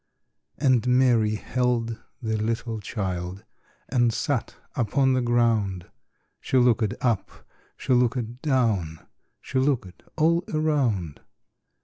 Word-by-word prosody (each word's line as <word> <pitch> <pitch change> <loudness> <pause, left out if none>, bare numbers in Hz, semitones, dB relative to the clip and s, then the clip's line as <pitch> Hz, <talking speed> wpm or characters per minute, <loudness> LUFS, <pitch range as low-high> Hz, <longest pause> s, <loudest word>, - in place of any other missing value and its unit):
And 130 -4 +2
Mary 120 -4 +3
held 120 -1 -1 0.2
the 110 -1 -1
little 115 +1 -2
child 95 -3 -4 0.4
And 120 -2 +2
sat 130 +1 -2 0.2
upon 130 +3 +2
the 130 - +2
ground; 115 -7 +1 0.5
She 130 - 0
looked 120 -3 +3
up, 120 -6 0 0.5
she - - 0
looked 120 0 0
down, 110 - 0 0.4
She 130 - -1
looked 130 -9 -1 0.2
all 170 +2 +3
around. 135 - 0
120 Hz, 105 wpm, -25 LUFS, 110-130 Hz, 0.5 s, Mary